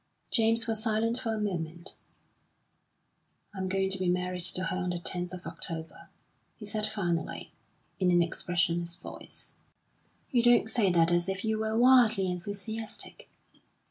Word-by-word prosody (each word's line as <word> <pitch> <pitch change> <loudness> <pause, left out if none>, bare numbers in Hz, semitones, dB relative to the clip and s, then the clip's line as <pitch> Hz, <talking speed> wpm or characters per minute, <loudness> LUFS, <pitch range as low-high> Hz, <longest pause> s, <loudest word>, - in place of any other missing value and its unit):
James 225 -1 +3
was 225 -1 -2
silent 225 +2 0
for 225 - -2
a 220 - -2
moment. 170 -3 -4 1.5
"I'm 190 -1 -3
going 190 0 +1
to 190 - +4
be 185 -1 +1
married 180 0 -1
to 185 - -1
her 185 0 -2
on 180 -1 -2
the 175 - -2
10th 175 0 -2
of 180 -1 -9
October," 165 -2 -4 0.5
he 210 - -9
said 210 +1 0
finally, 175 -6 -3 0.5
in 185 -2 +3
an 175 -1 +5
expressionless 170 0 -1
voice. 175 - -10 0.8
"You 245 - +4
don't 240 -2 +4
say 215 -6 +3
that 170 -1 +4
as 175 +2 +2
if 190 +2 -3
you 220 0 0
were 220 0 -1
wildly 235 -6 +5
enthusiastic." 205 +5 -5
190 Hz, 150 wpm, -29 LUFS, 175-220 Hz, 1.5 s, an